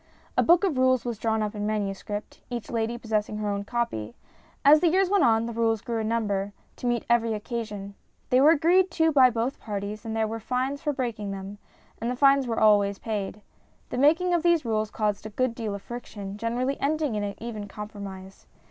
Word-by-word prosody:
A - - +4
book 345 +3 +5
of 325 -10 +1
rules 255 -1 +3
was 235 -3 -3
drawn 220 -1 0
up 210 0 -3
in 210 -1 -3
manuscript, 205 0 -4
each 240 -4 -5
lady 230 0 -1
possessing 215 -2 -2
her 210 -1 -2
own 200 0 -2
copy. 160 - -3 0.5
As 300 +2 +8
the 350 - +3
years 375 +2 +2
went 405 -2 +4
on 225 -1 +3
the 235 - -4
rules 225 -2 +1
grew 230 -1 -3
in 220 - -2
number, 205 -3 -1 0.2
to 245 - -4
meet 240 -1 0
every 230 -2 +2
occasion. 210 -3 -5 0.4
They 255 +1 +5
were 290 - +7
agreed 345 +4 +4
to 320 -1 +2
by 265 -4 +6
both 240 +3 -2
parties, 205 0 -5
and 225 -1 -4
there 220 -1 +1
were 225 +1 -4
fines 255 +5 -2
for 295 - 0
breaking 235 -7 -3
them, 195 +1 -7 0.4
and 230 - -2
the 250 - -1
fines 275 0 +4
were 225 -1 -1
always 205 -2 +4
paid. 210 -1 -4 0.5
The - - -3
making 330 +6 +4
of 345 - +2
these 340 -4 +3
rules 215 -1 0
caused 210 -1 -2
a - - -8
good 255 +3 0
deal 220 -3 -4
of 200 - -9
friction, 205 -5 -7
generally 240 +5 -2
ending 300 -2 0
in 210 -1 -1
an 200 -1 -3
even 215 -3 -6
compromise. 200 -2 -9
225 Hz, 210 wpm, -26 LUFS, 210-255 Hz, 0.5 s, As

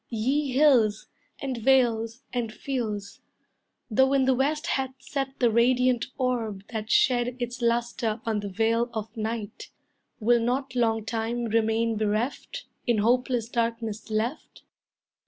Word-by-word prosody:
Ye 260 +5 0
hills, 245 -7 +4 0.4
and 265 -3 -2
vales, 235 -1 +2
and 240 -3 -2
fields, 215 -5 -4 0.7
Though 265 +5 +4
in 270 -1 +3
the 260 - +4
west 295 +5 0
hath 265 -6 -1
set 270 +1 -4
the 240 -2 +3
radiant 250 +1 +3
orb 230 -7 -1
That 220 0 -4
shed 245 0 +3
its 245 0 -4
lustre 235 -1 0
on 220 -2 0
the 205 -1 -5
veil 230 +4 +1
of 220 +1 -5
night, 220 -1 -4 0.5
Will 235 +2 +4
not 255 +2 -1
long 225 -3 +1
time 230 +1 -2
remain 225 0 +1
bereft, 220 - -2 0.2
In 240 -2 +3
hopeless 240 +1 +1
darkness 230 -2 -2
left? 220 +6 -3
235 Hz, 135 wpm, -26 LUFS, 220-255 Hz, 0.7 s, hills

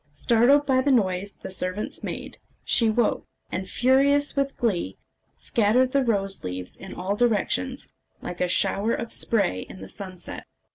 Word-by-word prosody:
Startled 240 - +3
by 260 -2 +3
the 285 - 0
noise 200 -4 +1
the - - -9
servants 185 +2 -3
made, - - -6 0.3
she 230 -2 +3
woke, 225 +1 0 0.2
and, 190 0 -4
furious 280 +4 +3
with 275 -1 -1
glee, 180 - -1 0.4
scattered 240 +4 +2
the 275 0 +2
rose 195 -5 0
leaves 90 0 -5
in 190 - -10
all 190 +3 -2
directions, 245 +4 0 0.3
like 180 - -7
a 180 - +2
shower 205 +5 +1
of 230 - -5
spray 200 - +2
in 95 - -10
the 95 - -10
sunset. 185 - -8
215 Hz, 155 wpm, -25 LUFS, 185-255 Hz, 0.4 s, Startled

